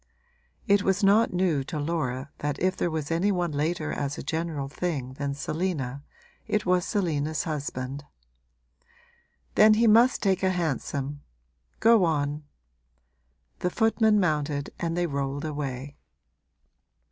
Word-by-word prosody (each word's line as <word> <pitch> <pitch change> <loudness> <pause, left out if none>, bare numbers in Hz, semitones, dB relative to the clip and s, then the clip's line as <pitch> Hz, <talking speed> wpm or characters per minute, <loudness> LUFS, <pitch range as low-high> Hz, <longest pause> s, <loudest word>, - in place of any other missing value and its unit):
It 200 0 +4
was 195 +1 +1
not 205 +4 +5
new 175 -6 +1
to 155 - -5
Laura 145 -3 -2
that 145 -1 -2
if 185 +1 +1
there 175 - 0
was 155 -1 -3
any 175 +5 +2
one 175 -3 0
later 155 +2 -1
as 140 0 -3
a - - -6
general 160 -4 -2
thing 140 -4 -3
than 140 +1 -3
Selina 145 -4 -3 0.5
it 210 - 0
was 180 -1 +2
Selina's 155 -7 -1
husband. 140 -3 -4 1.5
'Then 215 0 +6
he 230 +2 +3
must 230 +4 +5
take 195 -2 +2
a 190 - +2
hansom. 145 -4 -2 0.6
Go 225 -3 +5
on.' 150 -2 0 1.2
The 180 - 0
footman 220 0 +3
mounted 150 -5 0
and 170 0 -2
they 175 - +1
rolled 140 -1 -3
away. 140 -2 -5
160 Hz, 135 wpm, -27 LUFS, 145-185 Hz, 1.5 s, Then